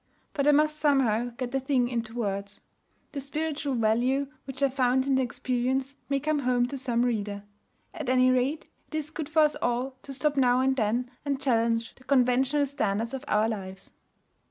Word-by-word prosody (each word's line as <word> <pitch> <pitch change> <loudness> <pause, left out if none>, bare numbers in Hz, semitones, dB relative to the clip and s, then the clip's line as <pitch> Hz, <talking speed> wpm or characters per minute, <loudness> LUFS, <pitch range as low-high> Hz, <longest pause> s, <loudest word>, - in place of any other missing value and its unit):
But 280 -1 0
I - - +8
must 305 +1 +2
somehow 260 -7 +3
get 250 -2 -3
the 270 - 0
thing 265 -2 +1
into 230 -2 -4
words. 200 -3 -3 0.5
The 285 - -4
spiritual 290 0 -2
value 245 +5 +1 0.2
which 270 0 -4
I 275 - +4
found 260 0 +2
in 275 - +1
the 265 - +3
experience 255 +2 -1 0.2
may 275 -1 +1
come 305 +1 0
home 250 -2 +2
to 280 - -5
some 245 -2 0
reader. 205 -4 -2 0.5
At 305 -7 -5
any 255 0 +4
rate, 260 +5 0 0.2
it - - -8
is 310 -1 -3
good 315 -2 -5
for 315 0 +4
us 300 - +3
all 245 +2 0
to 275 - -9
stop 290 +2 -1
now 250 -1 +4
and 265 0 +2
then 240 +1 0
and 280 -2 -1
challenge 230 -3 +1
the 255 - -21
conventional 265 +2 +2
standards 230 -3 -2
of 270 0 -5
our 215 -2 +2
lives. 190 -3 -6
255 Hz, 190 wpm, -27 LUFS, 235-280 Hz, 0.5 s, I